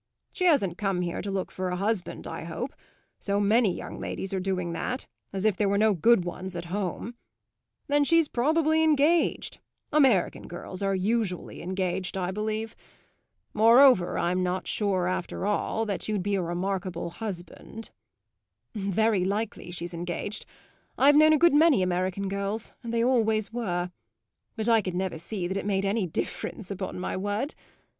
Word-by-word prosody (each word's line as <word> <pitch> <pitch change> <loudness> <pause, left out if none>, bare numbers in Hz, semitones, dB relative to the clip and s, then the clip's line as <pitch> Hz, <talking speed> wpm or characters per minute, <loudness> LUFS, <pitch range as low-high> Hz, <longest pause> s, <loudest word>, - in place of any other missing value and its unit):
She 365 - -1
hasn't 205 - +3
come 195 -3 0
here 175 -1 -2
to 200 - -5
look 195 -1 -2
for 185 0 -3
a 180 - -1
husband, 200 0 -2
I - - -6
hope; - - -5 0.5
so 200 0 0
many 210 +1 +4
young - - -7
ladies 195 - -4
are 190 - 0
doing 180 -2 -2
that, 250 +10 -3 0.3
as 195 +1 -3
if 215 -3 +3
there 200 0 +1
were 200 - +2
no 215 0 +4
good 195 +1 +4
ones 180 +1 -5
at 170 0 -4
home. 205 +3 -3 0.7
Then 290 0 +3
she's 330 +1 +4
probably 315 +5 +2
engaged; 315 +2 +2 0.3
American 265 - +3
girls 180 +2 -7
are 195 0 +1
usually 200 -1 -1
engaged, 185 0 -2
I 180 -1 -1
believe. 215 +2 -3 0.8
Moreover 230 -2 +6
I'm 180 +2 +1
not 180 +1 -1
sure, 190 -4 0
after 185 +1 -3
all, 210 +2 0
that 200 -3 -3
you'd 205 -4 0
be 205 +1 -1
a 195 - +1
remarkable 180 0 -3
husband." 210 +2 -7 0.8
"Very 205 0 +1
likely 200 +1 -2
she's 175 0 -5
engaged; 175 +4 -4 0.5
I've 285 +2 +6
known 310 +1 +7
a - - +5
good 340 +1 +5
many 295 - +5
American 185 +2 -1
girls, 200 +3 -3
and 235 -2 -5
they 230 0 +1
always 220 -4 +2
were; 180 -7 -2 0.6
but 220 -1 -3
I 225 -1 +5
could 185 -3 -4
never 185 -3 -2
see 180 +2 -4
that 190 +2 -2
it 195 - -3
made 195 -1 +1
any 200 -1 0
difference, 185 +4 -4
upon 190 -1 -4
my - - -3
word! 205 +9 -2
200 Hz, 165 wpm, -27 LUFS, 185-225 Hz, 0.8 s, known